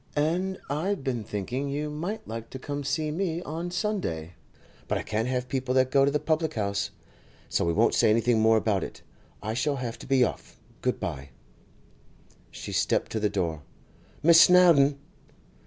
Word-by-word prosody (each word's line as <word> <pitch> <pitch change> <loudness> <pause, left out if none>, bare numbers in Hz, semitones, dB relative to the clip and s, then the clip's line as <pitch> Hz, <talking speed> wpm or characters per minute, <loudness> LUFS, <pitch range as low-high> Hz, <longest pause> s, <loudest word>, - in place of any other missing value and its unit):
And 175 +6 0
I'd 165 +4 -2
been 125 -5 -2
thinking 120 +8 -3
you 150 +2 -3
might 190 +9 -5
like 115 0 -6
to - - -7
come 145 +2 -5
and 140 -1 -4
see 150 +3 -1
me 170 0 -2
on 165 +3 -4
Sunday, 175 - -3 0.5
but - - 0
I - - -4
can't 110 +2 -1
have 125 0 -2
people 130 0 -2
that 130 0 +3
go 135 0 +5
to - - +3
the 150 +1 0
public 155 +1 -1
house, 100 -2 -1 0.6
so - - +1
we 85 - +1
won't - - +3
say - - +4
anything 115 +1 +3
more 110 0 +5
about 105 -3 +1
it. - - -8 0.4
I 110 - -2
shall 140 +5 0
have 125 -3 -5
to - - -10
be 135 -1 +4
off; 120 - -4 0.2
good - - -1
bye!' 70 +1 -5 1.2
She - - -8
stepped - - 0
to 110 - -1
the 105 -1 +1
door. 85 -6 -2 0.6
'Miss 165 +1 +8
Snowdon! 170 -7 +6
135 Hz, 185 wpm, -27 LUFS, 110-160 Hz, 1.2 s, Miss